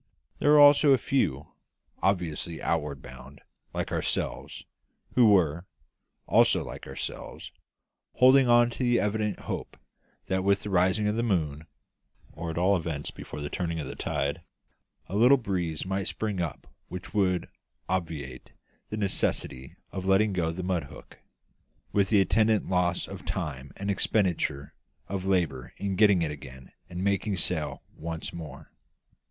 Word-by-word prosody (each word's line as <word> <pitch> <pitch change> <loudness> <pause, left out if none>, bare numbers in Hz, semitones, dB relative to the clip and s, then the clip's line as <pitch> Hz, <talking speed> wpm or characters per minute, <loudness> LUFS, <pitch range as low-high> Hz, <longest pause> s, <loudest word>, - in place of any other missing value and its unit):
There - - +2
were 150 0 +7
also 145 0 +8
a - - +5
few 120 - 0 0.5
obviously 85 -3 -1
outward 75 -5 -2
bound, 65 +3 -12 0.3
like - - -3
ourselves - - -2 0.5
who 120 -3 +6
were 85 -3 +3 0.6
also - - +4
like - - -8
ourselves 65 - -6 0.6
holding 130 +1 +6
on 120 0 +5
in - - -9
the 120 -2 +3
evident 105 -1 -1
hope - - -5 0.5
that 95 0 -1
with 100 0 +3
the 105 - -5
rising 95 +3 +2
of 105 +1 0
the - - +1
moon, 80 -9 -1 0.6
or 85 +2 -6
at 80 - -5
all 95 +3 +3
events 80 -4 -3
before 75 - -8
the 75 - -4
turn 85 -2 -2
of 80 - -3
the - - -7
tide, 70 +1 -2 0.6
a 95 - -6
little 125 +6 +6
breeze 90 - -2
might 95 +1 -2
spring 105 -4 -2
up 85 -4 -4 0.2
which 90 +3 -8
would 90 -4 +1 0.4
obviate 80 -8 -4 0.4
the 110 - -4
necessity 95 -9 -1 0.2
of 95 0 -5
letting 100 +2 +3
go 85 -3 0
the 90 +3 -4
mud 90 -4 -1
hook, - - -14 0.7
with 100 -2 +2
the 105 -3 +5
attendant 110 +2 +2
loss 90 -1 +1
of - - -9
time 70 -2 -4
and 100 +1 -1
expenditure 85 -9 0 0.3
of 95 -1 -4
labour 80 -10 0
in 100 -1 -2
getting 100 -4 +5
it 75 - -1
again 65 -2 -11 0.2
and 90 +1 -4
making 100 0 0
sail 80 -2 -1
once 80 0 -5
more. 75 -5 -9
90 Hz, 150 wpm, -28 LUFS, 80-105 Hz, 0.7 s, also